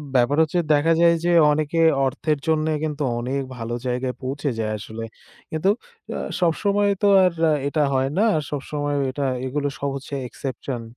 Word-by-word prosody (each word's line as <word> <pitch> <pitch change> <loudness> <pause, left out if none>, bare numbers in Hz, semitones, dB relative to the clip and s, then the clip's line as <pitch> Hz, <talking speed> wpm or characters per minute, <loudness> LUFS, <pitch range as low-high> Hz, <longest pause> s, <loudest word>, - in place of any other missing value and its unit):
ব্যাপার 130 +4 +3
হচ্ছে 160 +3 +1
দেখা 155 +3 +3
যায় 170 0 +6
যে 175 - +3 0.2
অনেকে 155 +2 0 0.3
অর্থের 150 +3 -1
জন্যে 155 0 +2
কিন্তু 150 -1 -2 0.2
অনেক 135 +3 -2 0.2
ভালো 115 0 -4
জায়গায় 125 0 -2
পৌঁছে 140 +2 -2
যায় 110 -1 -1
আসলে। 110 +2 -7 0.5
কিন্তু 160 +5 +1 0.5
আ - - -2 0.2
সবসময় 200 +4 +2
তো 205 - +4 0.2
আর 180 -2 +3 0.3
এটা 150 +1 +1
হয় 130 0 +1
না। 210 - +4
আর 155 - +1
সবসময়ও 145 0 -2
এটা 140 +2 -3 0.2
এগুলো 145 +2 -1
সব 140 - -1
হচ্ছে 140 +1 -8
exception। 130 0 -5
145 Hz, 165 wpm, -23 LUFS, 130-160 Hz, 0.5 s, যায়